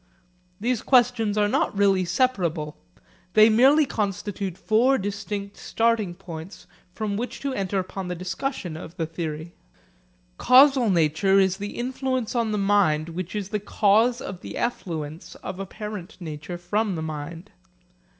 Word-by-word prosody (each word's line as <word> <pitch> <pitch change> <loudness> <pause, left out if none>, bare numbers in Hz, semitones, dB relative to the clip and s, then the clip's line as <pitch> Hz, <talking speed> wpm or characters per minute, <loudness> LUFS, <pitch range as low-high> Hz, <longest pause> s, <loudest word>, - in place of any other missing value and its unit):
These 235 +2 0
questions 240 -5 +3
are 210 0 +3
not 205 - 0
really 195 -2 +3
separable. 175 - 0 0.6
They 215 +1 +7
merely 270 +7 +5
constitute 200 -4 -3
four 230 +7 +3
distinct 200 0 -4
starting 225 -6 0
points 175 0 -9 0.3
from 205 +1 -3
which 245 +3 -4
to 275 -1 -2
enter 195 -3 -2
upon 185 0 -4
the 180 - -3
discussion 185 - -4
of 165 +2 -9
the 165 - -1
theory. 160 0 -5 0.9
Causal 260 -2 +6
nature 170 +2 +3
is 190 -1 +2
the 205 +1 -6
influence 255 -1 -2
on 230 -3 0
the 210 - 0
mind 195 -6 +2
which 180 +3 -5
is 205 -2 -3
the 210 0 -1
cause 220 +4 +2
of 185 -1 -7
the - - -7
effluence 160 -9 -4
of 190 - -6
apparent 205 0 -7
nature 160 0 -6
from 200 +3 -1
the 160 - -4
mind. 160 +4 -6
200 Hz, 145 wpm, -25 LUFS, 175-225 Hz, 0.9 s, They